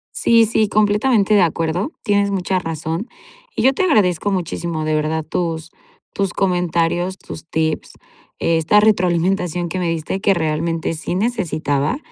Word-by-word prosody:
Sí, 230 Hz, -1 st, +4 dB
sí, 215 Hz, 0 st, +1 dB
completamente 210 Hz, +1 st, +2 dB
de 205 Hz, -, +5 dB
acuerdo. 170 Hz, -, 0 dB
Tienes 205 Hz, -2 st, +2 dB
mucha 190 Hz, -1 st, -1 dB
razón 165 Hz, -, -4 dB, 0.5 s
y -, -, -1 dB
yo 265 Hz, +1 st, +5 dB
te -, -, -2 dB
agradezco 205 Hz, -, +2 dB
muchísimo, 170 Hz, -3 st, -3 dB
de 155 Hz, -, 0 dB
verdad, 155 Hz, +1 st, -1 dB
tus 160 Hz, 0 st, -3 dB, 0.4 s
tus 195 Hz, -2 st, -1 dB
comentarios, 175 Hz, 0 st, 0 dB
tus 165 Hz, -3 st, -10 dB
tips, 160 Hz, 0 st, -2 dB, 0.4 s
esta 165 Hz, +5 st, +3 dB
retroalimentación 180 Hz, -3 st, +1 dB
que 185 Hz, +2 st, -4 dB
me 175 Hz, -2 st, -1 dB
diste 165 Hz, +4 st, -3 dB
que 195 Hz, -3 st, +3 dB
realmente 165 Hz, 0 st, -1 dB
sí 165 Hz, +2 st, -4 dB
necesitaba 185 Hz, -, -1 dB
180 Hz, 145 wpm, -19 LUFS, 165-205 Hz, 0.5 s, de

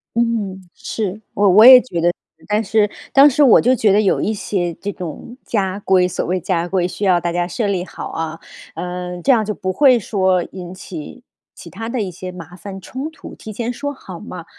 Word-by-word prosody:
嗯， 225 Hz, -5 st, -1 dB
是， 210 Hz, -1 st, -4 dB
我 205 Hz, 0 st, +2 dB
我 215 Hz, +5 st, +7 dB
也 255 Hz, 0 st, +11 dB
觉 175 Hz, -10 st, -4 dB
得 175 Hz, +1 st, +3 dB, 0.4 s
但 210 Hz, +1 st, +2 dB
是， 215 Hz, 0 st, +1 dB, 0.2 s
当 280 Hz, +2 st, +8 dB
时 290 Hz, +2 st, +3 dB
我 250 Hz, -, +7 dB
就 250 Hz, +2 st, +3 dB
觉 210 Hz, -5 st, +3 dB
得 210 Hz, -, +4 dB
有 200 Hz, -, +2 dB
一 220 Hz, -, -1 dB
些 180 Hz, -4 st, -2 dB
这 205 Hz, +5 st, -5 dB
种 185 Hz, -, -8 dB
家 195 Hz, -3 st, -1 dB
规， 185 Hz, -2 st, +3 dB
所 180 Hz, -, -3 dB
谓 185 Hz, +2 st, 0 dB
家 175 Hz, -1 st, -1 dB
规， 180 Hz, -1 st, 0 dB
需 200 Hz, +2 st, -4 dB
要 180 Hz, -2 st, +4 dB
大 170 Hz, 0 st, -1 dB
家 175 Hz, 0 st, -1 dB
设 225 Hz, +4 st, -2 dB
立 185 Hz, -2 st, -1 dB
好 -, -, -8 dB
啊， 165 Hz, 0 st, -5 dB, 0.4 s
嗯， 180 Hz, 0 st, -5 dB
这 275 Hz, -, +4 dB
样 225 Hz, -4 st, +3 dB
就 210 Hz, -, -2 dB
不 185 Hz, -2 st, -3 dB
会 255 Hz, +5 st, +5 dB
说 185 Hz, -3 st, +1 dB
引 180 Hz, -1 st, -8 dB
起 185 Hz, +6 st, -9 dB, 0.3 s
其 -, -, -11 dB
它 225 Hz, 0 st, -7 dB
的 235 Hz, -1 st, -2 dB
一 190 Hz, -3 st, -3 dB
些 185 Hz, +2 st, -8 dB
麻 175 Hz, 0 st, -11 dB
烦、 195 Hz, 0 st, -9 dB
冲 265 Hz, -, -6 dB
突， 320 Hz, -, -12 dB
提 215 Hz, -, -9 dB
前 235 Hz, +3 st, -3 dB
说 285 Hz, +4 st, -4 dB
好 185 Hz, -9 st, -10 dB
嘛。 170 Hz, -1 st, -9 dB
195 Hz, 235 characters per minute, -19 LUFS, 180-225 Hz, 0.4 s, 也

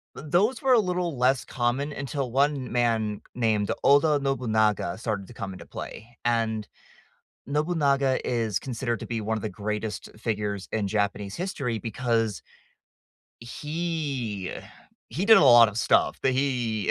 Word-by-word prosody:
t -, -, -9 dB
those 205 Hz, -, +1 dB
were 260 Hz, -1 st, +5 dB
a 235 Hz, -, +6 dB
little 180 Hz, -5 st, -1 dB
less 125 Hz, +1 st, +2 dB
common 130 Hz, +4 st, -1 dB
until 135 Hz, -2 st, -3 dB
1 140 Hz, -1 st, +1 dB
man 115 Hz, -4 st, 0 dB
named 110 Hz, -4 st, +1 dB
Oda 145 Hz, +2 st, +5 dB
Nobunaga 110 Hz, -9 st, 0 dB
started 105 Hz, -4 st, -3 dB
to -, -, -12 dB
come 100 Hz, -4 st, -6 dB
into -, -, -11 dB
play, 115 Hz, +2 st, -9 dB
and 115 Hz, -2 st, 0 dB, 0.8 s
Nobunaga 140 Hz, -3 st, +1 dB
is 115 Hz, -5 st, 0 dB
considered 120 Hz, -2 st, -3 dB
to -, -, -6 dB
be 115 Hz, -2 st, -3 dB
one 110 Hz, +1 st, -1 dB
of -, -, -9 dB
the 110 Hz, -, -2 dB
greatest 105 Hz, 0 st, -4 dB
figures 105 Hz, -3 st, -3 dB
in 110 Hz, -2 st, 0 dB
Japanese 100 Hz, -1 st, -1 dB
history 140 Hz, -, -2 dB
because 115 Hz, -1 st, -1 dB, 1.0 s
he 140 Hz, -, -3 dB, 0.6 s
he 180 Hz, +6 st, -2 dB
did 225 Hz, +1 st, +8 dB
a 150 Hz, -, +6 dB
lot 120 Hz, -3 st, +8 dB
of 105 Hz, -, -8 dB
stuff. -, -, +2 dB
The 135 Hz, -, +3 dB
he 125 Hz, -5 st, 0 dB
120 Hz, 150 wpm, -26 LUFS, 110-140 Hz, 1.0 s, did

